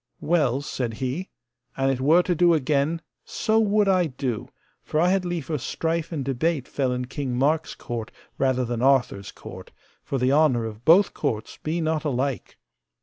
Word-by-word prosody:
Well, 145 -6 +1
said 120 -5 -3
he, 135 - -3 0.5
an 135 0 +2
it 130 -1 -2
were 160 +6 +5
to 180 - 0
do 175 0 +4
again, 150 +3 0 0.2
so 220 0 0
would 210 -1 +3
I 185 -3 +3
do, 125 -5 -4 0.3
for 155 - -2
I 175 +2 +4
had 190 -1 +1
liefer 165 -4 -3
strife 165 +6 -2
and 145 -5 -3
debate 135 +2 -1
fell 135 -3 -1
in 125 0 -2
King 130 -1 -4
Mark's 150 +5 +1
court 115 -2 -6 0.3
rather 130 -2 +1
than 120 0 -3
Arthur's 125 -7 +2
court, - - -11 0.3
for 135 - -2
the 130 +1 +2
honour 140 -6 +3
of 110 +1 -8
both 180 +4 +6
courts 110 -1 -3
be 165 +2 -2
not 160 -1 0
alike. 135 -2 -2
140 Hz, 175 wpm, -24 LUFS, 125-165 Hz, 0.5 s, both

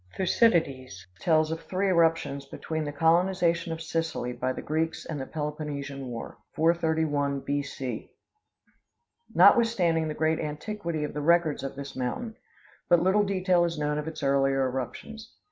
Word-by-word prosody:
Thucydides 140 - +1
tells 155 -1 +2
of 165 0 -3
three 190 +2 -1
eruptions 165 -6 +1
between 160 +2 -4
the 145 - -3
colonization 170 +2 +2
of 165 0 -4
Sicily 160 -6 -2
by 125 +1 -2
the - - -6
Greeks 160 +2 -2
and 150 -4 -4
the 130 - -6
Peloponnesian 145 -3 -5
war 120 -2 -7 0.2
431 160 -4 +1
B. 145 +1 -1
C. 130 -4 -6 1.3
Notwithstanding 180 -9 +5
the 155 - -4
great 160 0 +1
antiquity 160 +1 -4
of 150 - -4
the 150 - -3
records 165 -1 +3
of 135 - -5
this 140 0 -7
mountain, 175 - -3 0.5
but 175 - +6
little 190 +3 +4
detail 185 -3 +2
is 170 -2 -1
known 150 0 -1
of 150 - -5
its 160 -2 -6
earlier 135 -1 +2
eruptions. 215 - -6
160 Hz, 150 wpm, -27 LUFS, 140-170 Hz, 1.3 s, but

